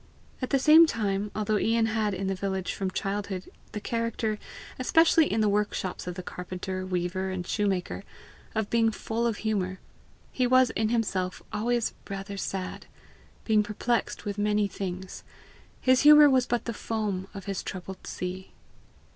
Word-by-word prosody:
At 255 - -2
the 275 - +3
same 315 +4 +8
time, 205 -5 -1
although 215 0 +1
Ian 225 0 +2
had 215 -2 0
in 195 +1 -3
the 195 - 0
village 190 -1 -2
from 190 -1 -2
childhood 195 0 -3 0.2
the 210 - -4
character, 230 -1 -2 0.4
especially 325 +4 +4
in 220 +2 +1
the 215 - +3
workshops 205 -3 -1
of 180 - -4
the 185 - -6
carpenter, 185 +1 -5
weaver, 185 +1 -1
and 185 -1 -4
shoemaker, 195 -2 -1 0.5
of 220 -2 -1
being 230 -1 +4
'full 225 +2 -2
of 225 -3 -1
humour, 190 -4 -1 0.5
he 255 -1 +1
was 255 -1 +5
in 220 -1 0
himself 195 -6 -1
always 235 +2 0 0.2
rather 200 0 -5
sad, 190 -1 -4 0.6
being 215 -2 +4
perplexed 215 +3 -1
with 205 0 -3
many 210 0 +2
things: 185 -1 -6 0.6
his 255 0 +4
humour 295 -1 +9
was 255 -1 +3
but 240 0 -1
the 235 - -2
foam 210 -4 -3
of 195 - -7
his 195 -2 -3
troubled 185 0 -7
sea. 185 +1 -5
210 Hz, 160 wpm, -28 LUFS, 190-230 Hz, 0.6 s, humour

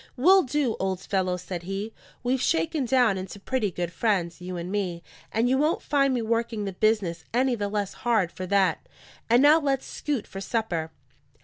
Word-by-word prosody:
"We'll 375 +9 +6
do, 270 -5 0
old 190 -1 -1
fellow," 185 -2 0
said 180 0 -6
he. 195 +5 -5 0.3
"We've 250 +1 0
shaken 210 - +1
down 240 -6 +3
into 190 +2 -7
pretty 220 0 -1
good 175 -1 -4
friends, 180 -6 0
you 180 0 -5
and 175 +2 -5
me; 180 -4 -2 0.3
and 225 +2 +1
you 260 +2 +2
won't 305 +3 +1
find 275 -1 +2
me 245 -3 0
working 230 -1 -1
the 195 - -4
business 200 -4 +1
any 255 +1 +3
the 205 -3 -2
less 205 -1 -2
hard 220 -8 +2
for 185 -1 -6
that. 195 -1 +1 0.4
And 240 +3 +5
now 300 +3 +7
let's 275 -3 0
scoot 285 -8 -3
for 195 - -8
supper." 195 -8 -2
215 Hz, 190 wpm, -26 LUFS, 185-255 Hz, 0.4 s, now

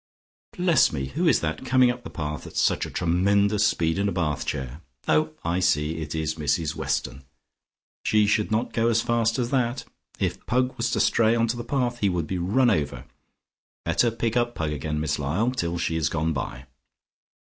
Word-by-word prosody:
Bless 175 -2 +4
me, 70 -3 -3
who - - 0
is - - +4
that 80 +6 -3
coming 130 -1 +4
up 125 0 -8
the - - -7
path 75 -1 -5
at - - -9
such - - +2
a - - -8
tremendous 100 +4 +2
speed 80 -3 0
in 100 0 +1
a - - -2
bath 80 -6 -2
chair? 65 +3 -4 0.3
Oh, 155 0 +2
I 85 +2 +1
see, 80 -3 +1
it 75 0 -5
is 80 -1 -1
Mrs 75 +1 0
Weston. 70 -3 -3 0.8
She 105 -1 +3
should 105 0 +1
not 110 +3 -1
go 115 0 +2
as 115 -1 +2
fast 115 -1 +1
as 120 -2 -1
that. 125 -1 0 0.3
If - - -2
Pug 125 +1 +1
was 115 -2 -1
to - - 0
stray 115 0 +3
on 115 0 +2
to 120 - 0
the 120 - -5
path 120 -1 -1
he 100 - +2
would 90 -3 -1
be 90 +2 -3
run 115 +8 +3
over. 75 -9 -1 0.8
Better 120 - +2
pick 115 0 -2
up 120 0 +1
Pug 80 -2 -2
again, 75 +1 -3
Miss 75 -1 -1
Lyall, 85 - 0
till 85 -9 -2
she 80 - -1
has 80 -3 0
gone 80 0 -1
by. 65 -2 -5
100 Hz, 200 wpm, -25 LUFS, 80-120 Hz, 0.8 s, Bless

